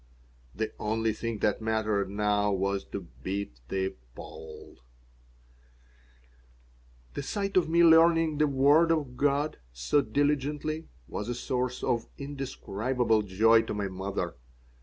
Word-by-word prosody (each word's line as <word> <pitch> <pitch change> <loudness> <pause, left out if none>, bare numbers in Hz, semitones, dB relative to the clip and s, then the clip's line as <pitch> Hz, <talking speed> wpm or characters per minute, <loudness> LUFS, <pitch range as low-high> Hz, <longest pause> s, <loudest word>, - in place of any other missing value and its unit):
The 110 +1 -3
only 110 +1 0
thing 115 +1 -4
that 105 +1 +1
mattered 110 -3 0
now 105 0 +1
was 100 0 0
to 100 - -6 0.2
beat 95 -11 -4
the 95 +6 -1 0.2
Pole - - -11 2.3
The - - -3
sight 200 +7 -3
of 180 -3 +3
me 170 +1 +4
learning 165 -2 +5
the 150 - +4
Word 145 +4 +4
of 145 -6 -1
God 145 +3 0
so - - +1
diligently 145 +5 -1 0.2
was 105 - -5
a 120 - -2
source 125 0 -2
of 115 - 0
indescribable 130 -4 -1
joy 110 +3 +4
to 115 - -5
my 100 -1 -2
mother. 95 -2 -3
115 Hz, 125 wpm, -28 LUFS, 105-145 Hz, 2.3 s, learning